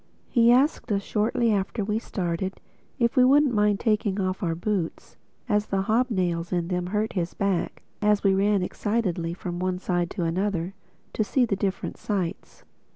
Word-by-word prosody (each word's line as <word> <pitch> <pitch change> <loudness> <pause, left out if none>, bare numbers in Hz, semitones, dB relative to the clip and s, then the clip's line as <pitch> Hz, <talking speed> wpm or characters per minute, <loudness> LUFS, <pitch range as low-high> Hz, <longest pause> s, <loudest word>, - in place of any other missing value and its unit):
He 235 -1 +5
asked 260 -1 +2
us, 200 -1 +1
shortly 225 +2 +1
after 200 +2 -1
we 210 +1 0
started, 185 -3 -3 0.4
if 235 -3 +1
we 255 - +6
wouldn't 275 +1 +5
mind 210 -1 +2
taking 210 -3 +1
off 185 -1 -1
our 165 -4 0
boots, 180 -1 -3 0.3
as 210 0 +1
the 195 -1 0
hobnails 190 -7 0
in 175 -1 -1
them 180 -1 -1
hurt 210 +3 -1
his 175 -3 -2
back 195 -3 -1 0.2
as 210 -1 +3
we 195 -1 +4
ran 200 0 +2
excitedly 180 -5 -1
from 175 -1 -5
one 185 0 -1
side 175 -1 -1
to 180 - -3
another 180 +1 -1 0.4
to 215 - +1
see 250 +4 +2
the 215 - -1
different 195 0 -3
sights. 190 -5 -4
200 Hz, 170 wpm, -25 LUFS, 180-215 Hz, 0.4 s, we